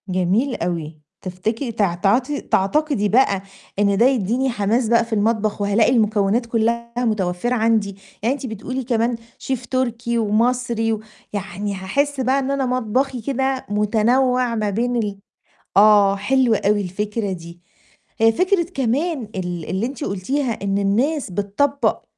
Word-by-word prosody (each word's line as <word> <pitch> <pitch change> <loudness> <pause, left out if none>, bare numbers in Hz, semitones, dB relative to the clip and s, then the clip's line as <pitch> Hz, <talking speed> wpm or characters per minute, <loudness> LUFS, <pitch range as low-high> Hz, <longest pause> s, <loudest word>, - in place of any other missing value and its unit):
جميل 185 +9 +1
أوي 165 -3 -4 0.2
تفتكري 215 +7 -3
تع 205 -5 +1
تعاطي 245 +11 +1
تعتقدي 210 +2 +1
بقى 210 -4 +3 0.4
إن 200 -1 +3
ده 230 - +5
يديني 255 +1 +1
حماس 225 +1 0
بقى 235 +1 +3
في 230 - -6
المطبخ 215 -1 0
وهالاقي 205 +4 +3
المكونات 215 -1 +2
كلّها 235 +1 -1
متوفرة 215 -1 0
عندي، 220 -4 +1 0.3
يعني 245 +5 +2
أنتِ 285 - -7
بتقولي 250 +3 -4
كمان 235 0 0 0.2
شيف 265 -3 -3
تركي 235 -2 -1
ومصري 230 +1 +1
و 215 - -3 0.3
يعني 200 0 -4
هاحس 275 +10 -1
بقى 260 +2 +2
إن 270 0 -2
أنا 275 -1 0
مطبخي 255 +1 -1
كده 265 +2 -1
متنوع 235 +4 +2
ما 215 -2 0
بين 240 +5 -1
ال 210 -4 -2 0.6
آه، 205 -1 +6
حلوة 235 +2 +2
أوي 205 0 +3
الفكرة 205 +2 -3
دي. 170 0 -10 0.6
هي 225 0 +5
فكرة 365 - +2
كمان 275 +5 0
ال 175 -4 -4
اللي 190 +5 -1
أنتِ 265 +1 -5
قُلتيها 240 +8 -1
إن 200 0 0
الناس 235 +6 0
بتطبق 205 +10 0
225 Hz, 145 wpm, -21 LUFS, 200-255 Hz, 0.6 s, آه